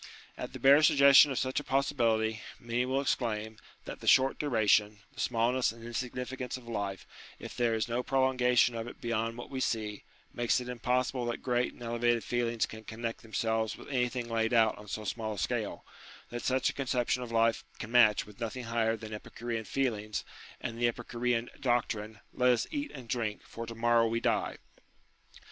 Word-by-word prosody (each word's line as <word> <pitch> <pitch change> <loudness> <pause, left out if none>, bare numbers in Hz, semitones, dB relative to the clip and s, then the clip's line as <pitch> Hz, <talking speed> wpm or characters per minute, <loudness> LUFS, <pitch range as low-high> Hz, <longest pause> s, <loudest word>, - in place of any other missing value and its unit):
At - - -6
the - - -7
bare 140 +3 +7
suggestion 140 -1 +7
of 135 - -2
such 130 +1 0
a - - -7
possibility, 115 -6 +1 0.2
many 120 +1 -1
will 135 +1 +1
exclaim, 110 -5 -1 0.3
that - - -7
the - - -9
short 130 +1 +5
duration, 105 -6 +2
the - - -13
smallness 120 +1 +1
and 115 0 -13
insignificance 125 +2 -4
of 125 -2 -14
life, 100 -4 -4 0.3
if - - -9
there 120 -2 +1
is 110 - -1
no 120 +1 -1
prolongation 125 -2 +3
of 115 0 -4
it - - -10
beyond 115 0 -2
what 120 - -8
we 130 - -3
see, 110 -5 -2 0.3
makes 120 0 +1
it 125 - -7
impossible 125 +1 -1
that 120 - -4
great 125 -1 0
and - - -12
elevated 120 0 +1
feelings 120 -2 0
can 110 0 -10
connect 115 +1 -5
themselves 110 0 -1
with - - -12
anything 125 -2 -1
laid 115 0 0
out 110 -2 +4
on 105 - -12
so 110 +1 -4
small 110 0 -3
a - - -12
scale: 90 - -2 0.5
that 120 0 -4
such 130 0 +1
a - - -17
conception 125 -1 0
of 120 -2 -6
life 115 0 +2
can 115 - -7
match 115 -4 +5
with 105 -1 -15
nothing 120 +2 -4
higher 115 -1 0
than 110 0 -8
Epicurean 115 +1 -5
feelings, 110 -6 -2 0.3
and 115 -1 -5
the 120 - +5
Epicurean 120 0 -1
doctrine 110 -5 -1
" - - -37
Let 125 0 +3
us 120 -2 +2
eat 290 -1 -3
and 130 -4 -10
drink, 115 -3 -2
for 115 0 -8
to 115 - -7
morrow 115 0 +3
we 115 +1 0
die." - - 0
120 Hz, 190 wpm, -31 LUFS, 110-125 Hz, 0.5 s, bare